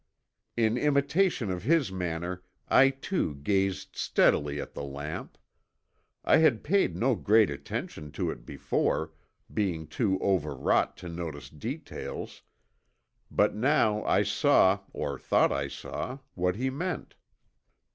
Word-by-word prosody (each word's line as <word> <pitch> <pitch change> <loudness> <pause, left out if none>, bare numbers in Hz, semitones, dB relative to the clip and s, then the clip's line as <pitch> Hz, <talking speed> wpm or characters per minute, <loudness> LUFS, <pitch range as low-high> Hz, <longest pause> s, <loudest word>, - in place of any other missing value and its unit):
In 115 +1 +2
imitation 140 - +2
of 90 -1 -3
his 145 - +2
manner, 90 0 -3 0.3
I 135 +1 +6
too 135 - -2
gazed 95 +6 -1
steadily 75 0 +2
at - - -6
the - - -5
lamp. 70 +2 -6 0.9
I - - +6
had 150 -9 +3
paid 195 +5 +2
no 130 +3 +2
great 110 -3 +4
attention 75 +1 -6
to - - -1
it - - -9
before, 80 0 -1 0.4
being 90 -7 -1
too 95 - 0
overwrought 75 -8 +1
to - - -4
notice 80 -6 -6
details, 125 - -6 0.9
but - - +2
now 110 -3 +2
I 105 - +3
saw, 105 -2 +4
or - - -4
thought - - +3
I 70 0 -1
saw, 125 - -5 0.2
what 90 0 0
he 130 +4 -1
meant. 175 +6 -4
100 Hz, 125 wpm, -28 LUFS, 80-130 Hz, 0.9 s, I